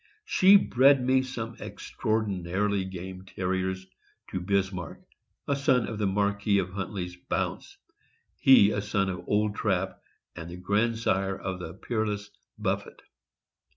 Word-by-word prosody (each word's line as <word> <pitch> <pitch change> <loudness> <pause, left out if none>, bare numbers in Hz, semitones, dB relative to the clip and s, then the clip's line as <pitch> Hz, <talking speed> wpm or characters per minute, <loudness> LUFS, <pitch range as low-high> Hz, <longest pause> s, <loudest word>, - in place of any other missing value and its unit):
She 200 - +6
bred 135 -5 +4
me 130 0 +4
some 120 -3 -6
extraordinarily 100 -2 -1
game 95 0 -7
Terriers 95 0 -2 0.5
to 95 - -2
Bismarck, 95 -2 -2 0.5
a 140 - +2
son 135 -4 +2
of 110 -2 -5
the 105 - +1
Marquis 100 +1 +1
of 90 -2 -1
Hunt 100 -2 -4
ley' 95 -4 -3
s 90 0 -10
Bounce, - - -2 0.6
he 115 -6 +6
a 100 - -1
son 100 -2 0
of 90 - -6
Old 105 0 +1
Trap 95 -3 -1 0.3
and 85 -1 -7
the 90 - -8
grandsire 100 0 0
of 95 -1 -4
the 80 -3 -7
peerless 105 -3 -3 0.3
Buffet. - - -3
100 Hz, 140 wpm, -28 LUFS, 95-110 Hz, 0.6 s, She